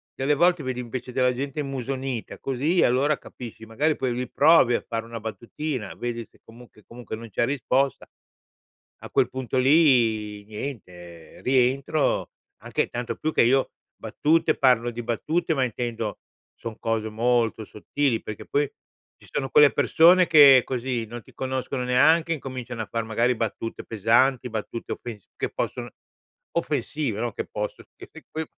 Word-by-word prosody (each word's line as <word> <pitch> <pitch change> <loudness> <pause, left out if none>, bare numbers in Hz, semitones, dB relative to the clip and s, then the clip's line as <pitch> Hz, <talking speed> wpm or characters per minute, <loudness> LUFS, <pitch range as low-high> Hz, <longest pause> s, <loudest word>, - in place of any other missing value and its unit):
delle 140 +3 +1
volte 175 +2 +3
vedi, 130 -1 -3
invece, 125 +1 -6
della 125 0 +2
gente 140 +3 -3
immusonita, 135 -2 -4
così, 145 +7 +1
allora, 140 +4 +2
capisci. 115 -2 -10
Magari, 145 +8 0
poi, 130 -3 -1
lì, 125 +1 -4
provi 145 -5 +5
a - - -1
fare 115 -1 -3
una 115 0 -7
battutina, 120 +3 -5
vedi 120 -1 -4
se - - -27
comunque 115 -2 -16
comunque 120 -2 -8
non 115 +1 -10
c'è 120 - 0
risposta. 135 +1 0 1.0
A - - -9
quel - - +2
punto 130 0 -4
lì, 120 -8 +3
niente, 90 - -9
rientro, 135 +3 +1 0.3
anche - - -1
tanto 120 -1 -4
più 155 +5 -2
che - - +4
io 130 +3 +2 0.2
battute 160 +2 +1
parlo 125 -3 +3
di 120 +1 -6
battute, 155 +8 -1
ma 135 - 0
intendo 115 -2 -3 0.4
son 115 -2 -7
cose 110 -1 -1
molto 115 0 +1
sottili 120 +4 -2
perché 105 - -8
poi 145 0 0 0.5
ci - - -19
sono 135 -1 -2
quelle 150 -1 +7
persone 175 +2 +5
che 140 -4 +8
così 125 -2 -2
non 120 +2 -8
ti - - -20
conoscono 130 0 -3
neanche, 160 +7 +4
incominciano 125 -5 -5
a - - -6
far, 115 -1 -2
magari, 115 +3 +1
battute 115 0 -4
pesanti, 120 +4 +2
battute 110 +1 -5
offens 110 -5 -8
che - - -2
possono - - -4 0.6
offensive 145 -7 -2
no, 120 -2 -2
che - - -5
possono, 105 0 -5
che - - -12
p - - -14
poi, 160 0 -3
125 Hz, 155 wpm, -25 LUFS, 115-140 Hz, 1.0 s, che